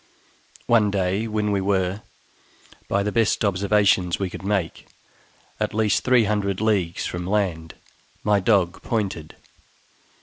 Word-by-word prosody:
One 110 -3 +3
day, 100 +2 -1
when 105 -1 -1
we 100 -1 0
were, 95 0 0 0.9
by 100 0 0
the 105 - -2
best 115 -1 +1
observations 100 -2 +2
we 95 -2 -3
could - - -8
make, 95 -4 -2 0.7
at - - -2
least 110 -3 +1
three 125 -2 +4
hundred 100 -2 -1
leagues 100 -6 0
from 90 0 -4
land, 90 -6 -1 0.5
my 105 -1 +3
dog 95 -3 +1
pointed. 95 -9 -3
100 Hz, 130 wpm, -23 LUFS, 95-105 Hz, 0.9 s, three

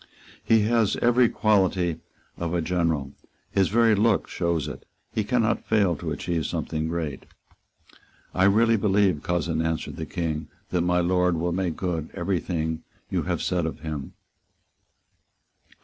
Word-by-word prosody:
"He 115 -1 +4
has 110 -1 +2
every 120 0 +4
quality 95 -5 +2 0.4
of 85 0 -3
a 85 - +1
general. 80 -5 0 0.4
His 95 -2 +2
very 115 +1 +4
look 105 +1 +2
shows 85 -4 -1
it. - - -7 0.3
He 110 - 0
cannot 115 +1 0
fail 100 -6 +3
to - - -5
achieve 85 -3 -2
something 80 0 -2
great." 80 -4 -4 1.1
"I 95 - +3
really 115 +3 +4
believe, 100 -6 +2
cousin," 85 -2 -1
answered 80 0 -2
the 80 - -5
King, 80 -3 -3 0.2
"that 90 - +1
my 90 0 +2
Lord 90 -1 +2
will 85 +2 -1
make 90 -2 -1
good 85 -4 -3
every 90 0 0
thing 80 -3 -2
that - - -12
you - - +2
have - - -1
said 90 -3 0
of 80 - -6
him." 75 -4 -5
90 Hz, 150 wpm, -25 LUFS, 80-100 Hz, 1.1 s, He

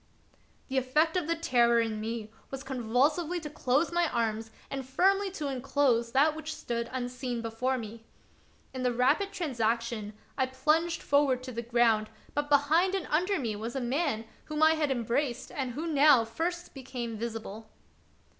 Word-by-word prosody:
The 265 -1 +1
effect 305 +6 +1
of 355 -4 0
the 335 - +1
terror 240 -7 +3
in 220 -2 -1
me 220 -1 -4 0.2
was 270 0 -6
convulsively 275 +7 +1
to 300 -2 -7
close 285 +3 +1
my 345 -1 +2
arms 225 -1 -1 0.2
and 270 -1 -3
firmly 385 +9 +2
to 305 -6 -3
enclose 255 -3 +1
that 295 +4 +4
which 315 0 -5
stood 235 -1 -3
unseen 250 -1 -3
before 240 +4 -1
me. 225 -1 -8 0.7
In 260 - -4
the 250 -1 +2
rapid 285 +11 +2
transaction 235 - -1 0.3
I 260 - +3
plunged 315 +6 +1
forward 280 -3 +2
to 255 - -6
the 235 -1 -4
ground, 230 -2 +2 0.2
but 290 0 -1
behind 315 +7 +3
and 380 -5 -2
under 365 +6 +2
me 230 -8 -2
was 225 +4 -5
a - - 0
man 255 -2 -1 0.2
whom 305 0 -1
I 315 - +7
had 310 -2 0
embraced 250 +1 -1
and 260 -3 -3
who 305 +6 -4
now 290 -6 +5
first 345 +9 -3
became 250 -4 -5
visible. 220 -1 -6
260 Hz, 165 wpm, -29 LUFS, 235-305 Hz, 0.7 s, I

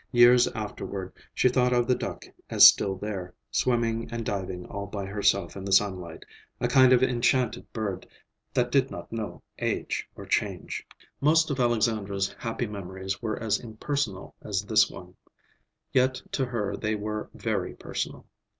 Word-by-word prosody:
Years 120 0 +7
afterward 100 -3 -5 0.2
she - - +3
thought 125 0 +3
of 120 -1 +3
the 125 - +3
duck - - -5 0.2
as - - +8
still 95 -1 +7
there, 95 -2 -5 0.2
swimming 115 -2 +1
and 115 -1 -4
diving 95 -3 -3
all 100 0 -6
by 100 -1 -5
herself 100 -2 +1
in 95 - -6
the 100 - -4
sunlight, 95 -4 +1 0.4
a - - +1
kind 130 -1 +6
of 130 0 +5
enchanted 125 -1 +1
bird 100 -5 -4 0.4
that 125 -1 +1
did 135 -1 +3
not - - -8
know 110 -2 -5 0.2
age - - -2
or - - -9
change. - - -2 0.3
Most 160 +2 +4
of 135 - -2
Alexandra's 110 -5 +1
happy 115 +1 -2
memories 95 -2 -5
were 110 -2 -2
as 110 -1 0
impersonal 110 -3 -3
as 100 -1 -2
this 110 +1 +4
one; 90 0 -11 0.8
yet 130 0 +3
to 130 - 0
her 105 -5 -2
they 110 +1 -1
were 105 0 -4
very - - -2
personal. - - -5
110 Hz, 160 wpm, -27 LUFS, 100-120 Hz, 0.8 s, as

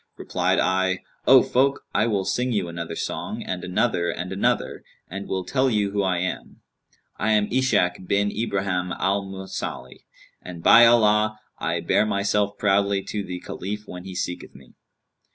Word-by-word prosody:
Replied - - 0
I, 95 0 +1 0.2
'O 130 -1 +8
folk, 135 +2 +1
I 110 +2 +2
will 100 -4 0
sing 125 +1 0
you 100 -6 0
another 85 -1 -6
song - - -4
and 90 -1 -4
another 90 -1 0
and 90 +1 -4
another 95 - -1 0.2
and 100 +3 -7
will 95 -1 -2
tell 130 +5 +1
you 105 -4 0
who 100 0 0
I 95 -2 0
am. 90 +1 -4 0.6
I 110 +2 +1
am 105 -1 +2
Ishak 95 -9 +1
bin 100 +1 +1
Ibrahim 95 -5 -2
al 100 +2 0
Mausili, 95 -9 -7 0.4
and 85 -2 -9
by 120 +1 +8
Allah, 110 -2 +3 0.2
I - - -1
bear 110 - +2
myself 100 0 0
proudly 100 -1 +1
to 105 -1 -4
the 90 -1 -6
Caliph 105 +3 -6
when 90 0 -9
he 95 -1 -8
seeketh 90 -1 -5
me. 65 -1 -16
100 Hz, 165 wpm, -24 LUFS, 90-105 Hz, 0.6 s, O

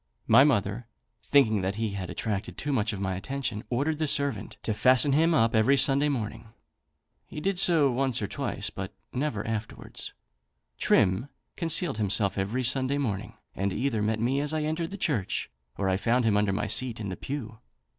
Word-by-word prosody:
My 135 - +7
mother, 115 -4 0 0.4
thinking 110 -8 +4
that 95 +2 -2
he 110 -2 -2
attracted 100 +2 -4
too 145 -1 -2
much 115 -2 +1
of 100 - -5
my 95 -1 -1
attention, 115 +2 -3
ordered 145 +5 -1
the 155 - 0
servant 140 -8 -1
to 110 - -1
fasten 130 +5 +5
him 165 +3 +3
up 115 -3 +3
every 115 +5 +4
Sunday 140 +2 +3
morning. 115 -4 -4 0.8
He - - -7
did 190 +3 -1
so 160 -7 +5
once 130 -1 0
or 105 - -2
twice, - - -3
but - - -7 0.2
never 125 -6 -2
afterwards. 110 0 -5 0.7
Trim 95 +9 +2 0.3
concealed 165 - +1
himself 100 -1 +1
every 100 +7 -1
Sunday 130 +2 +1
morning, 110 -9 -3 0.2
and 100 +1 -1
either 120 0 -1
met 110 +1 0
me 130 +5 +1
as 150 +2 -1
I 155 - -1
entered 160 +2 -2
the 200 - -7
church, 145 - -1 0.3
or 100 - -1
I 95 0 +2
found 120 +4 +1
him 110 -2 +3
under 105 -1 +2
my 105 +2 -1
seat 115 +3 -2
in 105 -3 -4
the 95 - -4
pew. 115 -4 -6
120 Hz, 185 wpm, -27 LUFS, 105-140 Hz, 0.8 s, My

